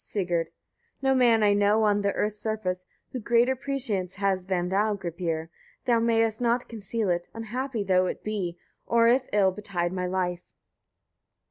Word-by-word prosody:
Sigurd. 175 -5 -1 0.5
22. 270 - -1
No 265 - +5
man 235 -4 +4
I 205 -1 +5
know 205 +2 +3
on 205 -1 +3
the 200 0 +1
earth's 210 0 -1
surface, 185 -5 -3 0.3
who 255 - -4
greater 240 +3 +3
prescience 235 -9 -3
has 195 -2 0
than 180 -2 -1
thou, 205 +2 +1
Gripir! 170 -3 -3 0.4
Thou 235 -2 +3
mayest 225 -1 +1
not 240 +1 +1
conceal 220 -1 -3
it, 175 0 -1
unhappy 230 +1 -3
though 185 -1 +3
it - - -5
be, 190 -5 -3 0.3
or 230 0 +4
if 255 +2 +3
ill 200 -2 +4
betide 185 -3 -3
my 180 -1 -2
life. 180 -1 -1
205 Hz, 165 wpm, -27 LUFS, 185-230 Hz, 0.5 s, No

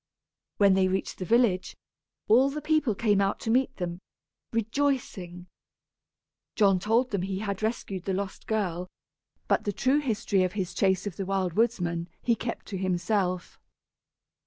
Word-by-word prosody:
When 200 -2 +5
they 190 0 +3
reached 190 +1 -2
the 185 - -3
village, 220 -4 +2 0.5
all 255 +5 +5
the 295 +2 -4
people 305 -8 +1
came 205 -2 +2
out 195 0 0
to 225 - -1
meet 260 +2 +2
them, 175 -1 -4 0.5
rejoicing. 225 -7 -1 1.1
John 195 -4 +4
told 230 +6 +1
them 200 -3 0
he 190 +1 -2
had 200 -1 -3
rescued 210 -4 -3
the 195 - -1
lost 195 0 -5
girl, 180 -5 -1 0.6
but - - +2
the 205 - -1
true 260 +8 +2
history 215 -7 0
of 185 - -1
his 190 -4 -3
chase 190 -1 +1
of 200 -4 -5
the 195 - -3
Wild 190 -3 0
Woodsman 175 -6 0
he 235 - +2
kept 230 +1 -4
to 195 -3 -4
himself. 185 0 -1
200 Hz, 160 wpm, -28 LUFS, 185-230 Hz, 1.1 s, When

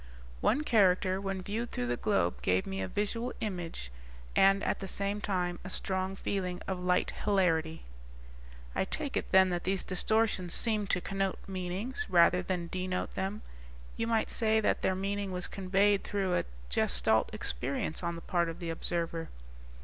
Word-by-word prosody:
"One 295 - +2
character 190 -5 +3
when 195 -1 -3
viewed 225 +5 -3
through 125 - -2
the 120 0 0
globe 90 -6 0
gave 90 0 +2
me 95 0 -3
a 95 - -2
visual 230 - -2
image 175 - -4 0.4
and, 195 +1 +5
at - - 0
the 195 - -5
same 200 +2 -1
time, 180 -3 -1
a - - -6
strong 190 0 -1
feeling 185 -2 -2
of 190 -1 -2
light 180 0 +1
hilarity." 165 -5 +1 0.9
"I - - +1
take - - -3
it - - -2
then 190 -1 +6
that 175 -1 -1
these 190 0 0
distortions 195 -1 +1
seemed 215 -3 +1
to 180 - +2
connote 195 0 -1
meanings, 195 - -3
rather 175 +1 +5
than 180 -2 -2
denote 185 +1 -2
them. 195 +3 -3 0.5
You 230 - -1
might 225 -1 +1
say 220 -1 +3
that 215 - +1
their 190 - +2
meaning 200 +1 -2
was 180 -1 -2
conveyed 195 +1 +2
through 195 -3 -1
a - - +1 0.3
Gestalt - - +2
experience 135 - -3
on 170 -1 -2
the 165 - -7
part 170 -1 0
of 165 - -6
the 170 -2 -4
observer." 165 0 -2
185 Hz, 170 wpm, -31 LUFS, 175-200 Hz, 0.9 s, then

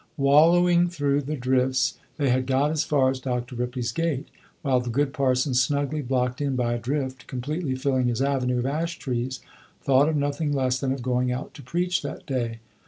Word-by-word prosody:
Wallowing 170 +5 +5
through 145 -4 0
the 150 +2 -3
drifts, 130 0 +1 0.2
they 140 -3 +1
had 130 +1 +1
got 135 +3 +2
as 160 0 +1
far 140 -4 +2
as 130 - -4
Dr. 125 -1 -3
Ripley's 125 0 -2
gate, 165 -5 -2 0.3
while 135 -3 +3
the 125 -1 -4
good 140 +3 0
parson, 130 0 +1
snugly 140 +4 +1
blocked 125 0 -1
in 140 -2 0
by 120 -1 0
a 120 - -2
drift 130 0 -3
completely 140 +3 -3
filling 130 -1 +1
his 120 -1 -1
avenue 135 -2 +1
of 120 - -1
ash 160 +5 -2
trees, 125 0 -3 0.4
thought 140 +2 +4
of 160 - 0
nothing 145 +1 0
less 130 -2 +1
than 130 0 -1
of 135 -2 -3
going 125 0 +1
out 125 +1 -5
to 155 - -11
preach 180 +3 -1
that 145 - -7
day. 115 -4 -3
135 Hz, 195 wpm, -25 LUFS, 125-145 Hz, 0.4 s, Wallowing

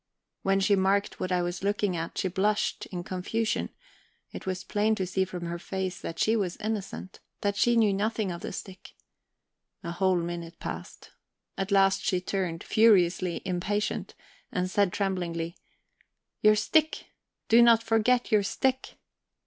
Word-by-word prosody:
When 195 0 +2
she 200 +1 +3
marked 195 +1 +1
what 185 - -3
I 180 -1 +2
was 175 +1 -3
looking 205 -2 0
at, 165 0 -5
she - - 0
blushed 205 +4 0
in 175 -2 -5
confusion; 205 +5 -2 0.6
it - - -9
was 185 0 -2
plain 215 +1 +1
to 190 - -2
see 190 +1 0
from 180 -1 -6
her 170 0 -4
face 190 0 -4
that 165 - -6
she 220 +5 +2
was 190 -5 -1
innocent, 205 -3 -5 0.2
that 200 0 0
she 240 +3 +3
knew 220 -3 +4
nothing 210 0 -1
of 170 - -6
the - - -5
stick. 190 -2 -9 0.9
A 170 - -4
whole 185 +1 +2
minute 170 0 -5
passed. - - -7 0.4
At 195 0 -3
last 195 -1 +3
she 185 - +1
turned, 180 -3 -3
furiously 185 -5 +3
impatient, 195 +3 -2 0.4
and 185 -5 -1
said 200 -2 +2
tremblingly: 175 -4 -2 0.9
"Your 215 0 +6
stick 310 +9 +1 0.4
do 230 +2 +6
not 230 -1 +6
forget 230 +2 +2
your 215 -1 +5
stick." 260 +6 -1
195 Hz, 155 wpm, -28 LUFS, 180-210 Hz, 0.9 s, Your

